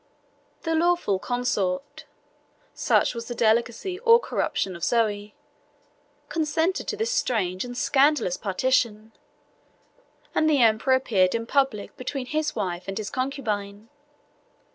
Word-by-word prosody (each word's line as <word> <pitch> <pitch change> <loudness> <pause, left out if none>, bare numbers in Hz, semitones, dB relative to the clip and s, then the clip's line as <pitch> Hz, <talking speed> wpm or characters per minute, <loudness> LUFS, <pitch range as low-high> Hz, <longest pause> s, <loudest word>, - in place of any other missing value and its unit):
The 325 - -1
lawful 330 - +2
consort 245 +5 -2 0.7
(such - - +2
was 230 -1 -6
the 240 - -5
delicacy 235 - +1
or 465 0 +6
corruption 190 - -2
of 170 - -9
Zoe) 210 -3 0 0.9
consented 320 +3 -1
to 430 - -3
this 445 +3 -1
strange 195 - 0
and 245 0 -7
scandalous 275 - +2
partition; 220 +1 0 1.2
and 310 - +2
the 295 -3 +3
emperor 225 +4 +4
appeared 200 -8 +2
in 230 0 -2
public 265 -6 0
between 255 +1 -4
his 305 +2 -2
wife 180 -1 -3
and 195 - -4
his 215 -1 -4
concubine. 220 -6 -3
245 Hz, 120 wpm, -25 LUFS, 205-295 Hz, 1.2 s, or